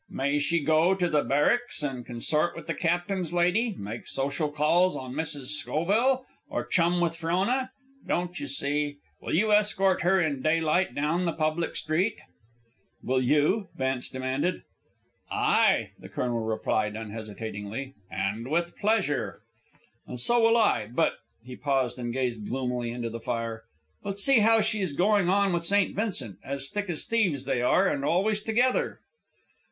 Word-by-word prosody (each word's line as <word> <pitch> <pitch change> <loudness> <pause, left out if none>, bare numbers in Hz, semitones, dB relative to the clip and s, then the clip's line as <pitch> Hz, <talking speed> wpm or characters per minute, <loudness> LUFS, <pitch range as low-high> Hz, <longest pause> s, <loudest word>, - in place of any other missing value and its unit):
May 140 +2 0
she 165 +3 +1
go 160 +4 +3
up - - -3
to 175 -2 +1
the 150 -1 +3
Barracks 150 - +1
and 130 -4 -3
consort 140 +8 -1
with - - -8
the 165 - -2
captain's 175 +1 -1
lady, 185 +6 +2
make 105 +4 -7
social 140 +3 -1
calls 160 +5 +2
on 130 -1 -6
Mrs. 145 -7 -2
Schoville, 215 - +1 0.2
or - - -3
chum 175 0 +2
with 170 -1 0
Frona? 190 +11 0 0.4
Don't 175 -1 -1
you 145 - -5
see? 145 +1 -2 0.2
Will - - -2
you 215 +5 +2
escort 205 -2 +3
her, 190 +2 +3
in 150 -6 0
daylight, 160 0 +1
down 160 +5 0
the 170 - +1
public 155 +1 -1
street?" 185 +8 0 0.9
"Will 130 +1 +1
you?" 150 - +2
Vance 130 -1 -1
demanded. 130 +7 -2 0.7
"Ay," - - +2
the - - -11
colonel 120 -2 -2
replied, 110 -1 -1
unhesitatingly, 110 +3 -6 0.2
"and 105 +5 -3
with 170 +2 0
pleasure." 195 - 0 0.7
"And 125 - -4
so 240 - +4
will 230 +1 +5
I; 205 - +2
but 125 - +2 0.2
" - - -41
He 125 0 -8
paused 135 -3 -1
and 120 -1 -3
gazed 120 -4 -2
gloomily 125 -2 -2
into 120 -1 -4
the 115 - -5
fire. 115 -1 -4 0.4
"But 200 -1 -5
see 255 +5 +5
how 225 +1 +5
she 210 -1 -1
is 180 -6 -1
going 195 +2 +3
on 200 0 +3
with 170 -1 0
St. 200 +3 +2
Vincent. 150 - -1
As 140 0 0
thick 205 -2 -3
as 160 - 0
thieves 185 - +1
they 130 -2 0
are, 180 +10 +3
and 140 -5 -1
always 200 +8 +1
together." 240 +4 +1
155 Hz, 165 wpm, -27 LUFS, 130-190 Hz, 0.9 s, will